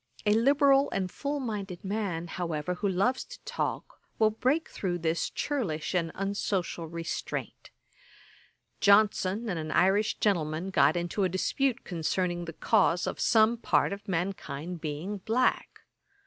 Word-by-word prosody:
A 210 - +4
liberal 275 +4 +4
and 185 -2 -2
full 285 +1 -3
minded 205 -8 -5
man, 190 -5 -2
however, 170 -1 -3
who 200 +3 -1
loves 200 +8 +1
to - - -11
talk, - - -4 0.2
will 215 -1 +4
break 260 +9 0
through 180 -3 -3
this 165 0 -1
churlish 200 - -2
and 165 -3 0
unsocial 195 -4 -2
restraint. 165 +1 -5 1.1
Johnson 205 +1 +3
and 180 -6 -2
an 155 0 -5
Irish 200 +6 +2
gentleman 170 -2 0
got 185 - +4
into 175 +4 -1
a 185 - +2
dispute 245 +8 0
concerning 175 0 -1
the 165 - -7
cause 180 -2 +2
of - - -4
some 225 +1 +4
part 225 - +1
of 200 +1 -9
mankind 175 -3 -3
being 165 +7 -4
black. 230 +6 0
190 Hz, 140 wpm, -29 LUFS, 170-220 Hz, 1.1 s, A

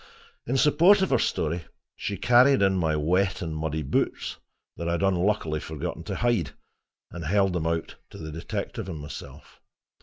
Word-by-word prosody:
In 130 +3 +1
support 175 +8 +5
of 190 - -1
her 130 - +4
story 85 +2 -1 0.3
she 100 - -4
carried 125 +3 +5
in 95 -1 +3
my 80 -4 +1
wet 90 +5 +1
and 80 -2 -4
muddy 80 0 -2
boots, 65 - -1 0.4
that 85 0 -3
I - - +1
had 85 - -1
unluckily 95 -4 +1
forgotten 80 -1 -5
to - - -3
hide, 115 - 0 0.6
and 85 - -7
held 95 +3 +2
them 85 -2 -1
out 80 0 -2
to - - -11
the 80 0 -7
detective 80 +4 -5
and 85 - -5
myself. 75 0 -10
85 Hz, 175 wpm, -26 LUFS, 80-105 Hz, 0.6 s, support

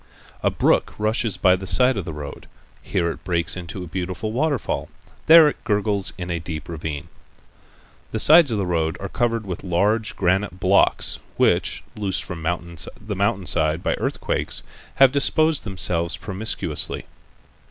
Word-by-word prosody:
A - - +2
brook - - +1
rushes 110 0 0
by 90 -1 +4
the 95 +1 -7
side 125 +9 +5
of 100 -5 -3
the 80 - -5
road. 75 -2 -8 0.3
Here 85 -2 -1
it - - -10
breaks 85 -4 -1
into 90 +1 -6
a - - -8
beautiful 95 +5 -4
waterfall. 140 +1 -1 0.4
There 160 -1 +9
it 150 - -3
gurgles' 105 -3 0
in 90 -1 -5
a 85 - -1
deep 80 -2 -6
ravine. 80 -3 -5 1.0
The - - -2
sides 155 +6 +6
of 110 - 0
the 100 - -1
road 80 -2 -1
are 100 - -5
covered 115 -1 -1
with 90 -3 -6
large 105 +5 +1
granite 95 0 0
blocks 95 +1 +3 0.2
which, - - +2
loosened 100 -3 -1
from 90 -3 -6 0.6
the 105 0 -5
mountain 100 -1 0
side 80 -1 +1
by - - +1
earthquakes, - - -2 0.3
have 135 -1 +6
disposed 150 +1 +2
themselves 85 -4 -1
promiscuously. 95 -5 -3
95 Hz, 155 wpm, -22 LUFS, 85-110 Hz, 1.0 s, There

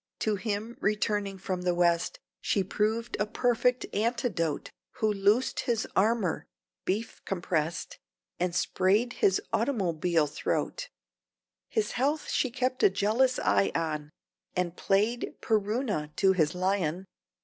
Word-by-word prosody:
To 215 -1 +1
him 215 +3 -3
returning 205 -2 0
from 185 -1 -3
the 180 -1 +1
West 175 - +2 0.2
She 195 - +1
proved 220 +5 -1
a 210 - +1
perfect 245 +2 +1
anti 235 +4 +1
dote, 165 -6 -2 0.2
Who 215 -1 +1
loosed 205 +6 +2
his 235 -3 0
Armour 210 -3 +1 0.4
(beef 215 +5 -2
compress'd) 175 - -2 0.4
And 180 -1 0
sprayed 200 +7 +2
his 190 - +4
"automobile 180 - +1
throat"; 150 0 -2 0.8
His 210 -1 0
health 285 +4 0
she 260 - +1
kept 255 +1 -1
a - - +7
jealous 220 +7 +2
eye 100 0 +2
on, 150 -2 -2 0.5
And 180 -1 -1
played 210 +7 +1
PerUna 210 - -1
to 195 -1 +4
his 160 -3 +1
lion! 185 -1 0
200 Hz, 125 wpm, -29 LUFS, 180-230 Hz, 0.8 s, a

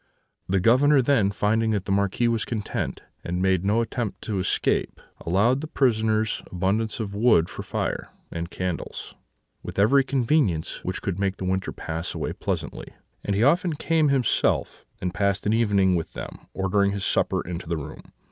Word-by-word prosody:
The 95 +1 +2
Governor 135 +8 +5
then, 120 -7 +3
finding 110 +3 +1
that 105 -3 0
the - - -3
Marquis 100 +4 +1
was 115 -2 +1
content, 110 -3 -3 0.2
and 90 +1 -2
made 95 -1 +2
no 105 +4 +2
attempt 115 -2 -3
to 105 -4 -2
escape, 95 - 0 0.3
allowed 115 +10 +3
the 155 - -5
prisoners 110 -6 +1
abundance 100 +6 -1
of 105 -3 -4
wood 105 -6 +3
for - - -6
fire, - - -3 0.2
and 85 0 -4
candles, 90 -1 -4 0.5
with - - -8
every 130 +8 +5
convenience 130 - 0
which 95 - -3
could 95 -2 -2
make 100 -1 0
the 95 - -5
winter 95 +1 -1
pass 80 +2 -5
away - - -3
pleasantly; - - -4 0.4
and 100 - -1
he 105 - +2
often 165 +4 +3
came 160 0 +2
himself 135 -5 +1
and 90 -1 -3
passed 100 0 0
an 105 - +2
evening 100 -5 +3
with 85 -2 -3
them, - - -8
ordering 100 +1 +1
his 100 -1 -3
supper - - +1
into 90 -1 -5
the 85 - 0
room. 75 - -7
100 Hz, 175 wpm, -25 LUFS, 95-115 Hz, 0.5 s, Governor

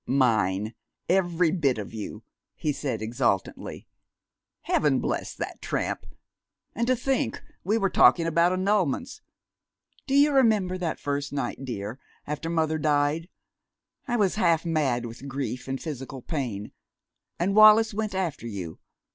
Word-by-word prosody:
"Mine, 110 -5 +2 0.3
every 175 -2 +2
bit 145 -8 +1
of 105 0 -6
you!" 105 0 -6 0.3
he 155 - -1
said 135 -6 -3
exultantly. 115 -4 -2 0.8
"Heaven - - +2
bless - - -2
that - - -6
tramp!... - - -2 0.7
And 235 +2 -1
to 255 - +4
think 265 +2 -1 0.2
we 210 +4 +1
were 195 -3 +1
talking 170 - +5
about 170 +2 +3
annulments!... 190 - 0 0.9
Do 270 - +1
you 290 +1 +6
remember 210 -8 +3
that 170 -3 -2
first 145 0 -2
night, 140 -1 -3
dear, 110 0 -5 0.3
after 150 +2 -4
mother 160 -1 0
died? 150 +3 +1 0.8
I 240 -1 0
was 205 -2 +1
half 170 -2 +3
mad 140 -7 0
with 120 +4 -8
grief 130 -3 -4
and 135 0 -3
physical 135 -4 -6
pain. 120 - -4 0.7
And 185 +3 0
Wallis 215 +1 +7
went 215 -1 -2
after 170 -10 -2
you. 90 -7 -6
155 Hz, 140 wpm, -26 LUFS, 125-190 Hz, 0.9 s, Wallis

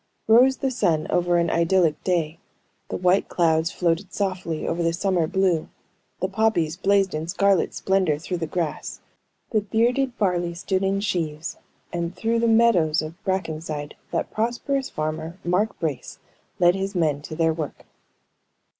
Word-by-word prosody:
Rose 250 +4 +6
the 270 - -1
sun 175 -10 +1
over 175 0 +2
an 170 -1 +1
idyllic 170 -2 +2
day; 165 -3 0 0.5
the - - -2
white 180 +2 +2
clouds 160 -1 +2
floated 175 +2 -1
softly 185 -5 -2
over 170 +1 -1
the 165 0 +1
summer 180 -2 +1
blue; 185 -3 +1 0.5
the 185 - +1
poppies 195 -6 +1
blazed 195 0 +2
in 155 +1 -3
scarlet 195 0 +2
splendor 190 -6 +1
through 175 +4 -4
the 165 - -2
grass; 165 -1 -3 0.5
the 215 -3 +2
bearded 240 +5 +1
barley 175 -4 0
stood 190 +2 -1
in 195 +1 +1
sheaves, 165 -5 -2 0.4
and 170 +1 -3
through 225 +5 0
the 235 - +2
meadows 190 -9 +4
of 165 +5 -9
Brackenside, 155 -5 -3 0.2
that - - -2
prosperous 245 +4 -1
farmer, 155 +2 -4
Mark 200 +5 +1
Brace, 150 -6 -4 0.4
led 175 -1 +5
his 195 +1 -3
men 155 -5 +1
to 155 +1 -7
their 165 0 +2
work. 155 -2 -6
175 Hz, 155 wpm, -24 LUFS, 160-200 Hz, 0.5 s, Rose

